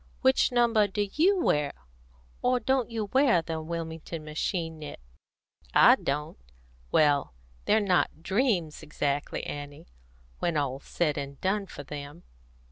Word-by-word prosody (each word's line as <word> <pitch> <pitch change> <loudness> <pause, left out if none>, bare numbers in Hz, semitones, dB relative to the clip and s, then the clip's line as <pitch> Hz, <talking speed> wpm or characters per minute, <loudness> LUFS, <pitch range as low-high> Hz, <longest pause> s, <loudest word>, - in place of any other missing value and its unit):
Which 260 -1 +4
number 235 -4 +3
do 205 +1 -2
you 370 +5 +3
wear? 150 - +1 0.7
Or 250 0 +2
don't 255 +1 +1
you 225 -2 -2
wear 260 - +4
the 160 -1 -4
Wilmington 165 0 -5
machine 160 +1 -3
knit? 150 -1 -8 0.8
I - - +8
don't. 145 - -3 0.5
Well, 145 - +3 0.3
they're 215 - +4
not 185 -5 +1
dreams 190 - 0
exactly, 145 -1 -2
Annie, 145 0 -7 0.5
when 170 -3 0
all's 140 -1 -2
said 150 -4 0
and 140 0 -7
done 195 +1 0
for 145 - -9
them." 145 +3 -8
165 Hz, 130 wpm, -28 LUFS, 145-215 Hz, 0.8 s, I